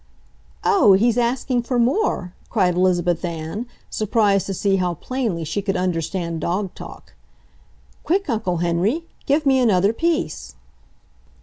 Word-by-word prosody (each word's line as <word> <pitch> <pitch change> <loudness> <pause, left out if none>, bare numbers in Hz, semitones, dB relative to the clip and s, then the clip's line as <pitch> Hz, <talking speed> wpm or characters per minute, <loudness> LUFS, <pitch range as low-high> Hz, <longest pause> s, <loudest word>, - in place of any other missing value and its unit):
"Oh, 215 - +5
he's 225 +4 +3
asking 245 +1 0
for 245 +1 -2
more!" 240 - +1 0.2
cried 185 -6 +2
Elizabeth 175 -1 +1
Ann, 170 +7 -4 0.2
surprised 210 -2 +1
to 195 - -2
see 195 +1 +1
how 180 -2 -1
plainly 225 - -3
she 160 +6 -2
could 195 -1 -1
understand 170 -1 -2
dog 185 +3 -2
talk. - - -11 0.9
"Quick, 390 +4 0
Uncle 220 -8 -1
Henry, 175 - 0 0.2
give 290 +2 +2
me 265 -1 +4
another 205 -4 +3
piece!" 225 - -2
195 Hz, 130 wpm, -21 LUFS, 175-245 Hz, 0.9 s, Oh